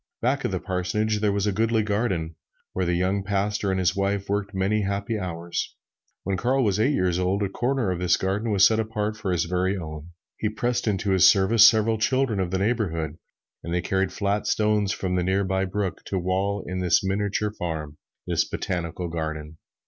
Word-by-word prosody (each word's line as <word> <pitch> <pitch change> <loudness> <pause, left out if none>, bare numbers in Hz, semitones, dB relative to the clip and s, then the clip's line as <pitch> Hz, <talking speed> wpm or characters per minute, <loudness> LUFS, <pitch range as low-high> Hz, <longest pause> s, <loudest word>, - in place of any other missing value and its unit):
Back 135 +3 0
of - - +1
the 95 - -1
parsonage 100 +4 -1
there 105 -1 +2
was 100 0 0
a 105 - +2
goodly 110 +2 +1
garden, 100 -6 -1 0.4
where 95 - -1
the 85 - +1
young 95 +3 0
pastor 100 +1 -1
and 95 0 0
his 90 0 +1
wife 100 0 -1
worked 100 -1 -1
many 100 +2 0
happy 100 +3 -2
hours. 85 -2 -4 0.5
When 95 0 -1
Carl 130 +5 +1
was 105 -2 +1
eight 135 +7 +3
years 90 -1 +1
of 90 - +1
age, 100 +2 +1
a - - -10
corner 120 0 0
of 90 - -2
this 90 -1 +3
garden 100 +4 -1
was 100 -2 +5
set 110 0 +4
apart 110 -1 -2
for 105 -3 -3
his 85 -3 +1
very 90 +3 0
own. 80 -2 -7 0.3
He 105 - -1
pressed 120 +2 -1
into 100 -1 0
his 95 -2 +6
service 105 +3 +6
several 110 -1 +3
children 130 -2 +1
of 95 -2 0
the 95 - -1
neighborhood, 90 -8 -1 0.4
and 85 - -5
they 90 0 +1
carried 95 -1 0
flat 100 +2 -1
stones 105 -2 +2
from 95 -1 -2
the 90 -1 +1
near 95 +2 +1
by 95 0 0
brook 95 -1 -3
to 95 - -2
wall 95 +2 -1
in 90 +1 -4
this 90 -1 +3
miniature 105 +2 -1
farm 80 -6 -5 0.3
this - - +1
botanical 90 -1 -3
garden. 80 -1 -5
95 Hz, 205 wpm, -25 LUFS, 90-105 Hz, 0.5 s, his